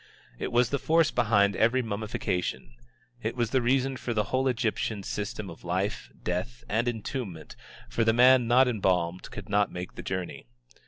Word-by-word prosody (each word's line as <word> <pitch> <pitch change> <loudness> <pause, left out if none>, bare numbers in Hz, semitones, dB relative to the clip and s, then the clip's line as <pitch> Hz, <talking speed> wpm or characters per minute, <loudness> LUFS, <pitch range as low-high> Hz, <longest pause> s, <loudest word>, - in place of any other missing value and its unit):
It - - -3
was 120 0 +3
the 140 - 0
force 165 0 +3
behind 105 -4 +3
every 120 +3 +3
mummification. 110 -2 -3 0.5
It 110 +1 -2
was 120 -2 -1
the 130 - +3
reason 130 +2 +1
for 120 -2 -4
the 105 - +2
whole 130 +1 +2
Egyptian 110 -4 -1
system 105 +1 -4
of 85 -2 -11
life, 95 +4 -2
death, 90 +8 -3
and 115 +3 0
entombment, 110 - -4 0.3
for 115 - 0
the 110 - +4
man 125 +1 +6
not 125 +2 +5
embalmed 90 -6 0
could - - -8
not 100 0 +2
make 90 0 -6
the - - -7
journey. 95 -8 -5
110 Hz, 170 wpm, -28 LUFS, 100-125 Hz, 0.5 s, man